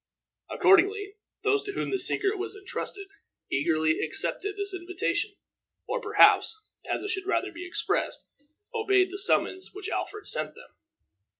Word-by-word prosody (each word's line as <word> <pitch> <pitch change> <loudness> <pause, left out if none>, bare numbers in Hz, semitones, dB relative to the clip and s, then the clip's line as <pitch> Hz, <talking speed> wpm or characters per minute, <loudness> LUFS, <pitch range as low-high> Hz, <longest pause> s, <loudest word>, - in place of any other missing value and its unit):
Accordingly, 400 +1 +4 0.3
those 420 -1 +3
to 405 0 -6
whom - - -2
the 390 - 0
secret 390 +2 +1
was 415 +2 -3
intrusted 395 0 -5 0.5
eagerly 155 +2 +2
accepted 405 +1 0
the 405 0 -1
invitation, 370 +3 -2 0.5
or, - - -2
perhaps, 440 - +5 0.3
as - - -1
it 405 - -3
should 385 0 -3
rather 390 0 0
be 350 +1 -8
expressed, 335 +2 -1 0.5
obeyed 390 -5 +3
the 395 - -5
summons 375 -1 +2
which 410 0 -5
Alfred 420 0 -4
sent - - -1
them. - - -15
395 Hz, 140 wpm, -28 LUFS, 370-410 Hz, 0.5 s, perhaps